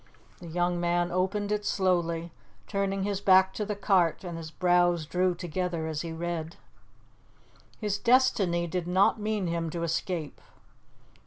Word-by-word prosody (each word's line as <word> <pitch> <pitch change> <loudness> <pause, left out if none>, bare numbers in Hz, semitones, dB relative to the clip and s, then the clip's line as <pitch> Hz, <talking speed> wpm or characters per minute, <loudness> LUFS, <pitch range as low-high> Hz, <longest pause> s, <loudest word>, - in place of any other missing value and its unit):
The 175 - -10
young 175 +1 0
man 175 0 0
opened 195 +3 -1
it 210 0 0
slowly, 175 -4 0 0.3
turning 195 -1 -1
his 200 -1 -2
back 190 -1 +5
to 210 - -3
the 210 - -2
cart, 190 -5 +2
and 175 -2 -5
his 165 -1 -7
brows 175 -1 +2
drew 180 +2 +1
together 175 -1 -3
as 155 -1 -3
he 170 - -5
read. 165 0 -4 1.2
His 210 -2 -2
destiny 210 -9 +3
did 170 +1 -3
not 190 +4 +3
mean 210 -2 -1
him 170 -1 -2
to 170 +1 -4
escape. 165 -1 -3
175 Hz, 150 wpm, -28 LUFS, 170-195 Hz, 1.2 s, back